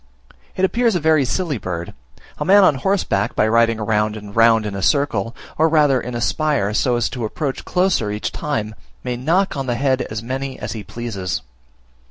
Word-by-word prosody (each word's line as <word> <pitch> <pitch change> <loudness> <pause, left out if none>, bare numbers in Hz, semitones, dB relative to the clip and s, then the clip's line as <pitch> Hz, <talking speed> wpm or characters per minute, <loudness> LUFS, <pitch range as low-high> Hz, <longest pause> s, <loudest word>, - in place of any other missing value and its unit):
It 190 - +2
appears 230 +1 +1
a - - +2
very 155 -3 +3
silly 155 - -2
bird. 85 -2 -5 0.5
A - - 0
man 195 +5 +6
on 185 - +5
horseback 135 - 0
by 105 - +3
riding 115 0 +3
round 105 0 0
and 105 -1 -10
round 115 -1 +5
in 105 - -4
a 100 - -4
circle, 115 +2 +1 0.2
or 160 +1 +4
rather 145 -5 +3
in 125 0 -6
a 120 - -3
spire, 140 -8 0
so 120 +3 +1
as 120 -2 +1
to 125 - -5
approach 135 +5 -3
closer 180 - +1
each 105 +1 -3
time, 110 -8 -3 0.3
may 125 -1 -2
knock 165 +11 +1
on 135 -1 -3
the 120 - 0
head 130 +1 +1
as 110 +1 -5
many 130 +2 -4
as - - -5
he 110 -2 -6
pleases. 100 -8 -4
120 Hz, 200 wpm, -20 LUFS, 110-150 Hz, 0.5 s, man